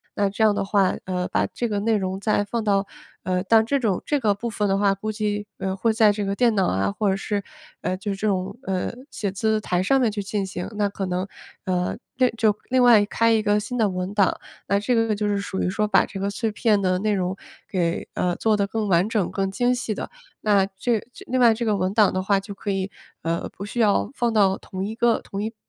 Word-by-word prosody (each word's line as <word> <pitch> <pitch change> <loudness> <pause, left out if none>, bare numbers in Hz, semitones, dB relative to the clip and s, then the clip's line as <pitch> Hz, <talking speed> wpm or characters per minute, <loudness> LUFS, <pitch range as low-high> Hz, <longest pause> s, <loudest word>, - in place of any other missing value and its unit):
那 200 -1 +1
这 205 +3 -1
样 215 -1 +5
的 - - 0
话， 195 -2 +2
呃， 180 -1 -2
把 100 0 +1
这 240 - -3
个 205 -1 -1
内 225 +1 +2
容 190 -2 -2
再 205 0 +1
放 230 +3 -3
到 200 -2 +1 0.4
呃， 185 0 0
但 220 +1 +5
这 280 +4 +1
种 210 -7 0
这 290 - +1
个 215 -5 +2
部 235 +4 -4
分 210 -1 -1
的 195 0 +2
话， 200 -1 +3
估 215 +3 -4
计， 210 -1 -2
呃， 190 0 -1
会 225 +3 +2
在 220 -2 +5
这 205 0 -2
个 195 0 -1
电 235 +1 +3
脑 190 -3 +2
啊 95 +1 0
或 205 - 0
者 190 - +2
是， 200 +1 -2 0.4
呃 185 - -1
就 200 +2 -4
是 195 - -4
这 215 - -1
种， 190 +2 -2
呃， 190 -1 -2 0.2
写 200 -2 -3
字 215 +2 0
台 180 -3 0
上 270 +9 +3
面 235 -3 +2
去 205 0 -3
进 200 0 -2
行。 180 -2 -5
那 205 -1 +1
可 200 -1 -4
能， 180 0 -2 0.4
呃 180 -1 -1 0.2
这 255 -1 +4
就 220 -2 +2 0.2
另 255 0 +3
外 230 -4 +7
开 230 +2 +2
一 220 -1 +3
个 210 0 +2
新 245 +4 -4
的 220 -3 +3
文 185 0 -3
档， 200 -3 +2 0.3
那 200 - +2
这 210 +5 0
个 225 -2 +2
就 210 +1 -2
是 205 -1 +1
属 195 -1 -3
于 - - +1
说 210 +3 0
把 210 - +4
这 195 - -8
个 200 +1 -1
碎 220 +2 -2
片 210 -1 +2
的 185 -1 +1
内 210 +2 +1
容 185 -1 -1 0.3
给， 170 -3 -1
呃， 180 -1 0
做 215 +2 +1
得 200 -1 +1
更 215 0 -2
完 175 +2 +3
整 215 -5 0
更 195 -1 -1
精 245 +5 +1
细 245 -3 -3
的。 - - -5 0.3
那 205 -2 +3
这 200 +3 -1 0.3
另 255 +1 0
外 235 -2 +6
这 235 +2 -3
个 210 -2 +1
文 185 0 -1
档 210 -2 +4
的 185 - 0
话 195 +1 +2
就 200 +1 -8
可 200 +1 -4
以， 195 0 -2 0.3
呃， 165 +1 -2
不 195 - -7
需 225 +4 -5
要 200 - +2
放 235 +5 0
到 195 -3 +3
同 185 0 -6
一 215 +3 -4
个 235 0 +2
同 195 - -6
一 220 +2 -3
205 Hz, 275 characters per minute, -23 LUFS, 190-220 Hz, 0.4 s, 外